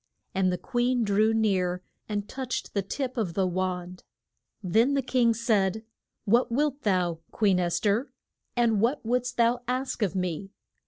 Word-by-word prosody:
And 185 -1 +2
the 180 - -1
queen 245 +2 0
drew 215 +1 +3
near, 185 -5 +1 0.3
and 205 -1 -2
touched 260 -1 -4
the 200 - +1
tip 255 +6 -4
of 185 -8 -1
the 195 - +2
wand. 180 0 -3 0.6
Then 225 +9 +3
the 275 - +1
king 240 -2 +2
said, 220 -2 +1 0.4
What 235 +4 +3
wilt 285 +2 0
thou, 180 -6 +1
Queen 200 -4 +2
Es 175 -1 0
ther? 215 +6 0 0.4
and 230 -4 +2
what 240 +3 +1
wouldst 250 +1 -1
thou 235 +1 +3
ask 255 0 -2
of 195 -3 0
me? 180 +1 -2
215 Hz, 160 wpm, -27 LUFS, 185-245 Hz, 0.6 s, drew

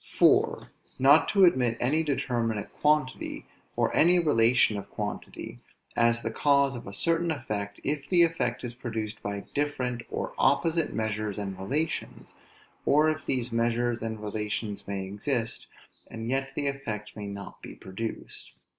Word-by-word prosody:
4. - - +3 0.3
Not 140 +4 +6
to 195 -2 +6
admit 125 -8 +3
any 145 +6 +2
determinate 120 -8 -1
quantity, 150 -3 0 0.3
or - - +1
any 175 +3 +5
relation 120 -8 +4
of - - -10
quantity, - - -6 0.4
as 115 0 +3
the 115 - -2
cause 140 +1 +3
of 120 - -8
a - - -6
certain 165 +10 +1
effect, 105 -9 -3
if 145 0 -2
the 175 -2 +6
effect 165 0 0
is 120 -1 -3
produced 110 -3 -5
by 100 0 -3
different 130 -5 -1
or - - -3
opposite 160 +4 +2
measures 110 -2 -2
and 100 -2 -4
relations; 140 +12 -3 0.5
or 155 +2 +4
if 155 -2 -6
these 125 -2 0
measures 120 0 0
and 110 -1 -4
relations 105 -1 -3
may 100 -1 -3
exist, 115 +4 -2 0.4
and 115 +1 -5
yet 135 0 -1
the 145 - -1
effect 115 -7 -4
may 105 -1 -6
not 100 0 -8
be - - -9
produced. 110 +4 -7
120 Hz, 150 wpm, -28 LUFS, 105-145 Hz, 0.5 s, Not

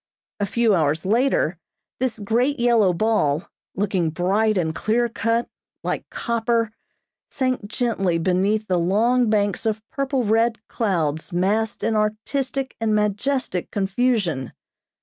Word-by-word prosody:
A 205 - 0
few 230 +1 +2
hours 155 -2 +1
later, 215 - +1 0.4
this 255 -2 -1
great 240 +7 0
yellow 235 -5 +4
ball, 175 -5 +1 0.3
looking 190 -4 0
bright 200 +6 +1
and 160 -3 0
clear 235 +7 +1
cut, 230 0 0 0.4
like - - -3
copper, 230 -1 0 0.6
sank 255 -5 -1
gently 205 -6 0
beneath 190 +5 +1
the 180 -2 +1
long 225 +7 +2
banks 205 -3 +1
of 220 -1 -2
purple 275 -3 -1
red 225 +2 +2
clouds 160 -8 -1
massed 205 +6 0
in 225 0 +1
artistic 255 +6 -1
and 220 -1 +2
majestic 210 -1 -1
confusion. 195 - 0
215 Hz, 125 wpm, -22 LUFS, 185-235 Hz, 0.6 s, yellow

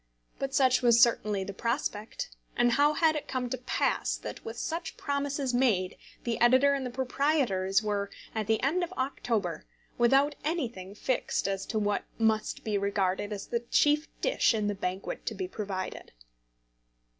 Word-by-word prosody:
But 270 0 -2
such 260 -2 +4
was 235 -2 +5
certainly 215 -5 +3
the 200 - -6
prospect; 230 - -3 0.3
and 240 0 +4
how 290 +5 +4
had 315 0 +3
it 300 - -4
come 250 -2 -3
to 260 - -1
pass 250 - 0
that, - - -8
with 225 +1 -7
such 330 +7 -4
promises 280 -2 -1
made, 220 -8 +2 0.3
the 235 -1 -2
editor 260 +4 +6
and 275 -1 -1
the 250 - -3
proprietors 245 -7 +1
were, 205 -1 -1 0.2
at 220 -2 -2
the 220 0 +2
end 335 +7 +2
of 350 - -4
October, 230 - -2 0.3
without 270 +5 +4
anything 235 - -3
fixed 250 -1 -1
as 195 -1 -2
to 220 - -2
what 205 -1 0
must 220 -1 +1
be 210 -2 0
regarded 200 0 0
as 205 -1 -4
the 235 - -1
chief 295 +6 +2
dish - - +3
in 215 -1 0
the 205 - +1
banquet 190 -1 -4
to 220 - -2
be 190 -2 -3
provided? 190 -1 -5
235 Hz, 165 wpm, -29 LUFS, 205-275 Hz, 0.3 s, editor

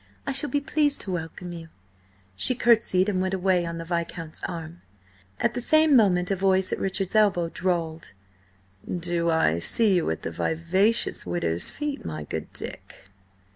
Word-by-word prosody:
I 275 - -2
shall 275 +2 +2
be 290 - +1
pleased 290 0 0
to 190 - -5
welcome 175 +1 -5
you." 165 -1 -9 0.7
She 250 - +4
curtsied 225 -6 +3
and 190 -3 0
went 190 0 -1
away 180 -2 +1
on 170 0 -5
the 165 - -6
Viscount's 165 -1 -4
arm. 170 -1 -7 0.6
At - - +1
the 245 - -3
same 310 +2 +4
moment 185 -5 +3
a - - +2
voice 190 0 +1
at - - -3
Richard's 195 -1 -2
elbow 200 -6 +3
drawled: 165 - -3 0.8
"Do 175 -1 -1
I 85 - +2
see 215 - +3
you 175 -3 +1
at 80 - -4
the 80 - -4
vivacious 175 - 0
widow's 85 -1 -1
feet, 295 -1 -5
my 75 -1 -5
good - - -6
Dick?" 95 - -5
180 Hz, 170 wpm, -25 LUFS, 165-210 Hz, 0.8 s, She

